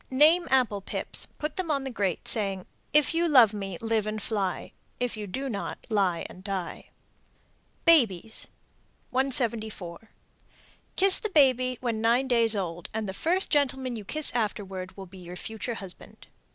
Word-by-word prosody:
Name 310 +6 +5
apple 245 -6 +2
pips, - - -3
put 300 0 -6
them 370 -3 -2
on 280 -3 0
the 265 - -5
grate, 200 -7 -2
saying, 195 -4 +1 0.3
If 300 +2 +3
you 335 +1 +1
love 245 -8 +6
me, 195 -4 -5
live 225 -2 0
and 215 0 -3
fly; 200 -3 -3 0.3
If 245 -2 -2
you 210 -1 -6
do 265 +9 -4
not, 205 -6 -4
lie 190 -5 +1
and 185 - -14
die. 195 -3 -5 1.0
BABIES. 225 - +3 0.6
174. 225 -7 -1 0.9
Kiss 385 0 +7
the 435 - -3
baby 255 - +3
when 230 -3 -2
nine 240 +4 +2
days 230 -3 +3
old, 175 -3 -4
and 220 -1 -2
the 190 - -4
first 355 - 0
gentleman 265 -3 0
you 215 - -7
kiss 305 +9 +2
afterward 195 -5 -3
will 195 - -8
be 190 +1 -14
your 175 0 -9
future 220 +4 -5
husband. 195 -4 -4
225 Hz, 160 wpm, -27 LUFS, 195-265 Hz, 1.0 s, Kiss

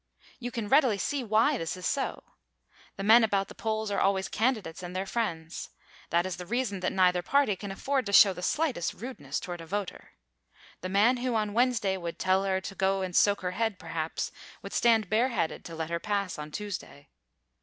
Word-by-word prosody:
You 245 -1 -4
can 230 -3 -4
readily 260 -3 +4
see 275 +6 -2
why 220 0 +3
this 165 +2 -3
is 180 - -7
so. 275 -1 -1 0.7
The 195 - -5
men 225 +3 +7
about 200 -3 +1
the - - -9
polls 220 -1 -2
are 200 - 0
always 195 -1 +1
candidates 215 -8 -1
and 180 0 -7
their 190 +1 -1
friends. 170 -8 -3 0.4
That 170 +1 +2
is 185 -2 -4
the 180 - -7
reason 240 -3 -1
that 185 - -1
neither 180 -1 +3
party 275 0 +2
can 200 +1 -7
afford 265 +4 -1
to - - -2
show 200 -1 +8
the 180 - -8
slightest 255 - 0
rudeness 250 +4 -5
toward 175 -2 -6
a 165 - -10
voter. 200 +1 -5 0.7
The 185 - -4
man 215 +6 +4
who 245 -1 -1
on 210 -2 0
Wednesday 230 -5 +2
would 170 -2 -5
tell 190 +1 +2
her 190 -1 +1
to 190 - -7
go 195 0 +1
and 180 -2 -4
soak 205 -1 +4
her 180 -1 -2
head, 220 +1 -1
perhaps, 165 -2 -4 0.3
would - - -7
stand 225 -4 +3
bareheaded 225 -4 0
to 165 - -7
let 160 0 -4
her 170 - 0
pass 200 -4 -2
on 150 0 -6
Tuesday. 155 -6 -7
200 Hz, 205 wpm, -29 LUFS, 180-225 Hz, 0.7 s, show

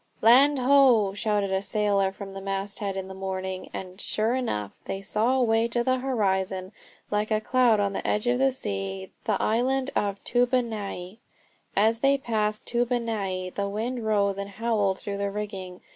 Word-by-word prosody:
"Land 270 +6 +6
ho!" 250 -6 +5
shouted 205 -1 0
a 190 0 +1
sailor 200 -2 +1
from 195 0 -9
the 195 - -7
masthead 195 0 -3
in 190 0 -4
the 190 - -8
morning, 190 -1 -4
and, 185 +1 -7
sure 220 +2 0
enough, 105 - -3
they 195 - -3
saw 220 +6 +1
away 230 -2 +2
on 240 - +2
the 255 +1 +1
horizon, 190 -7 -1 0.4
like 210 +1 0
a 215 -1 +2
cloud 240 -1 +3
on 200 -1 0
the - - -3
edge 210 +2 0
of 245 +1 +2
the 270 0 +4
sea, 95 - -4
the - - +1
island 260 +4 +1
of 200 -1 0
Toobonai. 225 -6 -1 0.6
As 220 +3 +3
they 275 +3 +4
passed 215 -5 -1
Toobonai 225 -7 -1
the 200 0 -2
wind 230 +4 -3
rose 200 -2 +1
and 200 0 -4
howled 205 -2 0
through 200 0 -5
the 200 0 -1
rigging. 195 -3 -6
210 Hz, 170 wpm, -26 LUFS, 195-240 Hz, 0.6 s, Land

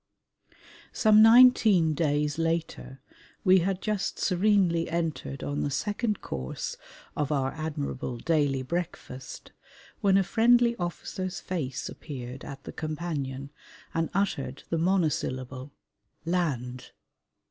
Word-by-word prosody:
Some 215 -1 +5
nineteen 225 -8 +7
days 150 0 0
later 165 -5 -2 0.4
we 185 -1 +6
had 190 +2 -1
just 210 -2 -1
serenely 185 -3 +2
entered 165 -4 -3
on 145 0 -2
the - - 0
second 210 - -1
course 65 -1 -5 0.4
of 150 0 -1
our 135 -2 0
admirable 145 -5 -4
daily 145 -2 +1
breakfast 135 -4 -6 0.5
when 195 -1 +4
a 195 - +4
friendly 235 +3 +4
officer's 180 +1 -4
face 145 -8 -4
appeared 130 -3 -8
at 140 -1 -9
the - - -8
companion 145 -4 -4 0.4
and 165 -1 0
uttered 140 -10 -1
the 165 - +1
monosyllable 145 -7 -1 0.5
"land." 130 -8 -2
165 Hz, 110 wpm, -28 LUFS, 140-190 Hz, 0.5 s, nineteen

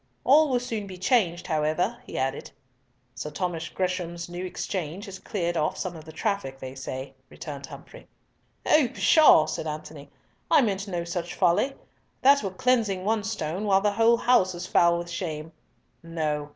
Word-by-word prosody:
"All 300 +3 +5
will 250 -2 +2
soon 225 -4 -4
be 185 -1 -9
changed, 185 -3 +1
however," 160 +7 0
he - - -6
added. 135 +1 -2 0.6
"Sir 150 - -5
Thomas 170 -1 -3
Gresham's 175 -2 -3
New 175 +1 -5
Exchange 180 0 -4
has 195 -2 -9
cleared 175 -5 -2
off 155 -1 0
some 180 -2 -4
of 160 -1 -11
the 160 - -10
traffic, 160 -6 -2
they 130 -1 -8
say," 130 0 -6 0.2
returned 140 -2 -8
Humfrey. - - -12 0.9
"Pshaw!" 305 - +6
said 160 - -4
Antony; 150 -1 -7 0.4
"I 280 - +6
meant 200 -2 -1
no 175 -3 -2
such 170 0 -4
folly. 185 +9 +2 0.5
That 280 +2 +6
were 195 - -2
cleansing 200 -2 +1
one 220 0 +1
stone 205 -3 -3
while 195 -1 +4
the 205 0 +2
whole 230 +2 +4
house 210 -7 +3
is 175 +1 -6
foul 170 -1 +4
with 170 0 -5
shame. 160 -3 -4 0.5
No. 155 -3 -3
180 Hz, 165 wpm, -26 LUFS, 160-205 Hz, 0.9 s, Pshaw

